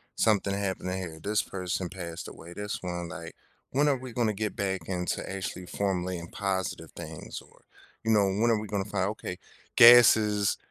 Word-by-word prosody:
something 100 -2 +2
happened 95 -2 -2
to - - -1
here, 85 -4 -6
this 105 +1 +1
person 90 -1 -3
passed 85 -3 -6
away." 85 +1 -11
This 105 +1 -4
one 85 -1 -4
like, - - -8 0.4
when 145 +3 +3
are 140 - +2
we 130 -2 -9
gonna 115 -3 +1
get 105 0 -3
back 95 -4 -1
into 90 -2 -2
actually 95 -1 -5
formulating 90 -3 -2
positive 95 -3 -2
things? - - -7
Or, - - -22 0.4
you 115 - +1
know, 105 -3 +4
when 105 +5 +2
are 110 - +2
we 110 - -6
gonna 100 -2 -2
find, 100 -2 -1
okay, 105 -4 -5 0.4
"Gas 120 0 +10
is 105 -2 +1
100 Hz, 185 wpm, -28 LUFS, 90-105 Hz, 0.4 s, Gas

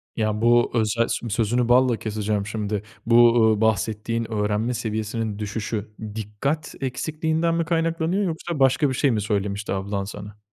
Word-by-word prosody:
Ya, 110 -1 -1
bu 120 +1 +4
özel 115 0 +1
sö 120 - -3
sözünü 115 +3 +1
balla 125 -1 +4
keseceğim 105 -2 -2
şimdi, 105 -1 -3 0.2
bu, 115 - +3
uuu, 115 -2 +5
bahsettiğin 110 +2 0
öğrenme 105 +3 0
seviyesinin 110 -2 -3
düşüşü, 105 0 -4 0.2
dikkat 115 +9 -3
eksikliğinden 160 +5 -1
mi 165 0 0
kaynaklanıyor, 165 +3 0
yoksa 170 -3 -3
başka 135 +2 +3
bir - - -1
şey 135 +1 +2
mi 110 -3 0
söylemişti 100 0 -2
ablan 100 +1 -2
sana? 105 +1 -9
115 Hz, 150 wpm, -23 LUFS, 105-130 Hz, 0.2 s, uuu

